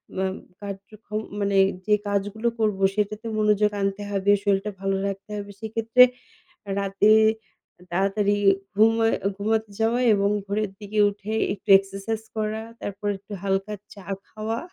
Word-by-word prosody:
ম -, -, -7 dB, 0.4 s
কাজ 200 Hz, -1 st, -4 dB, 0.2 s
যখন 215 Hz, 0 st, -5 dB, 0.2 s
মানে 200 Hz, -1 st, +1 dB, 0.3 s
যে 210 Hz, -, +5 dB
কাজগুলো 205 Hz, +3 st, -1 dB
করব 210 Hz, -3 st, +1 dB, 0.2 s
সেটাতে 210 Hz, +1 st, -2 dB
মনোযোগ 210 Hz, -1 st, +3 dB
আনতে 195 Hz, +1 st, -1 dB
হবে, 200 Hz, 0 st, +2 dB
শরীরটা 200 Hz, 0 st, +1 dB
ভালো 195 Hz, 0 st, 0 dB
রাখতে 195 Hz, +1 st, -6 dB
হবে। 205 Hz, 0 st, -6 dB
সেক্ষেত্রে 225 Hz, +2 st, +4 dB, 0.8 s
রাতে 200 Hz, +1 st, +2 dB, 0.8 s
তাড়াতাড়ি 200 Hz, +2 st, +1 dB, 0.4 s
ঘুমায় 225 Hz, +2 st, +4 dB, 0.2 s
ঘুমাতে 220 Hz, +2 st, 0 dB
যাওয়া 230 Hz, +2 st, +2 dB
এবং 200 Hz, 0 st, +2 dB, 0.2 s
ভোরের 205 Hz, 0 st, -1 dB
দিকে 210 Hz, +1 st, -4 dB
উঠে 205 Hz, +1 st, -7 dB, 0.2 s
একটু 205 Hz, -, -19 dB
exercise 195 Hz, +3 st, -5 dB
করা 215 Hz, 0 st, -2 dB, 0.2 s
তারপর 205 Hz, +1 st, -6 dB
একটু 195 Hz, +2 st, -14 dB
হালকা 195 Hz, +1 st, -1 dB, 0.2 s
চা 200 Hz, -2 st, -13 dB, 0.2 s
খাওয়া। 220 Hz, +1 st, -3 dB
205 Hz, 135 wpm, -24 LUFS, 200-215 Hz, 0.8 s, যে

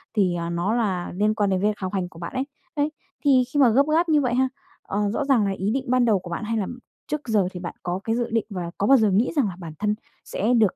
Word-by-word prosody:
thì, 185 Hz, -4 st, +2 dB
à, 170 Hz, 0 st, -3 dB
nó 175 Hz, +5 st, 0 dB
là 190 Hz, -7 st, -1 dB
liên 210 Hz, +2 st, +2 dB
quan 205 Hz, -3 st, +1 dB
đến 185 Hz, -1 st, +1 dB
việc 210 Hz, 0 st, +1 dB
học 185 Hz, 0 st, -4 dB
hành 180 Hz, -2 st, -1 dB
của 165 Hz, -, -14 dB
bạn 170 Hz, -, -6 dB
ấy, 260 Hz, +1 st, -1 dB, 0.3 s
đấy, 295 Hz, +1 st, +1 dB, 0.3 s
thì 260 Hz, -3 st, +6 dB
khi 290 Hz, -, +2 dB
mà 260 Hz, -, +7 dB
gấp 255 Hz, +5 st, +5 dB
gáp 335 Hz, +1 st, +3 dB
như 300 Hz, -2 st, +4 dB
vậy 250 Hz, -2 st, 0 dB
ha, 260 Hz, +1 st, +2 dB, 0.3 s
ờ, 205 Hz, 0 st, -1 dB
rõ 285 Hz, -, -1 dB
ràng 260 Hz, -7 st, +3 dB
là -, -, 0 dB
ý 195 Hz, +3 st, 0 dB
định 265 Hz, +1 st, -1 dB
ban 255 Hz, -1 st, +4 dB
đầu 210 Hz, -4 st, +3 dB
của 180 Hz, -, -10 dB
bạn, 170 Hz, +5 st, -4 dB
hay 225 Hz, +1 st, -1 dB
là 200 Hz, -3 st, -1 dB, 0.4 s
trước 300 Hz, -3 st, -4 dB
giờ 210 Hz, -5 st, +2 dB
thì 180 Hz, -, -7 dB
bạn 175 Hz, -, -6 dB
có 180 Hz, +1 st, -2 dB
cái 225 Hz, 0 st, 0 dB
dự 240 Hz, -1 st, -1 dB
định 225 Hz, -2 st, +1 dB
và 175 Hz, -3 st, -4 dB
có 200 Hz, -, +1 dB
bao 275 Hz, -, +7 dB
giờ 215 Hz, -4 st, +3 dB
nghĩ 215 Hz, +7 st, +2 dB
rằng 280 Hz, -7 st, +3 dB
là 185 Hz, -, -5 dB
bản 165 Hz, -3 st, -7 dB
thân 210 Hz, +1 st, +1 dB, 0.3 s
sẽ 225 Hz, +5 st, 0 dB
được, 220 Hz, -5 st, +3 dB
210 Hz, 295 wpm, -24 LUFS, 185-250 Hz, 0.4 s, mà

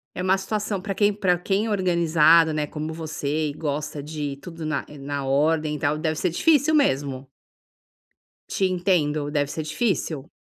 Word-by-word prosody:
é -, -, -3 dB
uma 190 Hz, +1 st, +3 dB
situação 210 Hz, +1 st, -2 dB
para 195 Hz, +1 st, -4 dB
quem 205 Hz, +1 st, +3 dB
para 190 Hz, -3 st, +1 dB
quem 195 Hz, +4 st, 0 dB
é -, -, -2 dB
organizado, 170 Hz, -4 st, +4 dB
né, 150 Hz, -1 st, -1 dB
como 155 Hz, +1 st, -5 dB
você 155 Hz, -1 st, -2 dB
e -, -, -5 dB
gosta 150 Hz, -1 st, -3 dB
de 145 Hz, -2 st, -5 dB
tudo 165 Hz, +1 st, -8 dB
na 155 Hz, -2 st, -2 dB
eh, 150 Hz, -, -12 dB
na 140 Hz, 0 st, -4 dB
ordem 150 Hz, +3 st, +1 dB
e -, -, -6 dB
tal, 150 Hz, -1 st, 0 dB
deve 155 Hz, 0 st, -1 dB
ser 180 Hz, -, +1 dB
difícil 300 Hz, -, +3 dB
mesmo. 135 Hz, -, +1 dB, 1.2 s
Te 195 Hz, -, 0 dB
entendo. 175 Hz, -6 st, +1 dB
Deve 145 Hz, -2 st, +1 dB
ser 155 Hz, -, -4 dB
difícil. 155 Hz, -, -2 dB
160 Hz, 180 wpm, -24 LUFS, 150-185 Hz, 1.2 s, organizado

